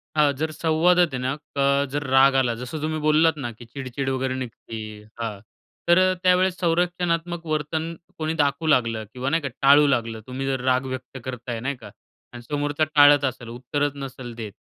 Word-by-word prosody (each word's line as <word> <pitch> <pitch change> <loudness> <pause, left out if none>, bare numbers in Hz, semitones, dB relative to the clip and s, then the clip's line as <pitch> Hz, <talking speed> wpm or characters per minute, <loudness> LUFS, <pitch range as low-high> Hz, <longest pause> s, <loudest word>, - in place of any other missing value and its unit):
हां, 150 -2 +4
जर 155 +2 -2
संवादात 170 +3 +3
आहे - - -1
ना 130 +1 -1
अ, 140 -1 0
जर 145 +1 -2
राग 135 +1 +5
आला, 130 -3 +2
जसं 125 +6 -6
तुम्ही 155 +1 -2
बोललात 155 +1 +3
ना 125 -5 -4
की 120 +1 -13
चिडचिड 130 +2 -5
वगैरे 130 0 -1
निघते 125 -3 -7 0.4
हां, 110 -3 -4 0.5
तर 175 0 +6
अ, 185 0 +4
त्यावेळेस 185 0 +3
संरक्षणात्मक 175 -1 0
वर्तन 155 +1 -2 0.2
कोणी 155 0 -2
दाखवू 145 0 0
लागलं 115 -6 +2
किंवा 130 +1 -2
नाही 165 +3 +1
का, 140 - -3
टाळू 145 +2 +6
लागलं, 115 -4 0
तुम्ही 130 +1 -4
जर 135 -2 -1
राग 130 0 +2
व्यक्त 130 +1 -8
करत 125 -1 -6
आहे 115 -1 -2
नाही 140 +4 -3
का - - -10 0.4
आणि 120 - -8
समोरचा 145 +1 0
टाळत 145 -1 +7
असेल, 125 -2 -4
उत्तरच 130 +5 -2
नसेल 135 -3 -7
देत, 110 -3 -6
140 Hz, 190 wpm, -24 LUFS, 130-155 Hz, 0.5 s, टाळत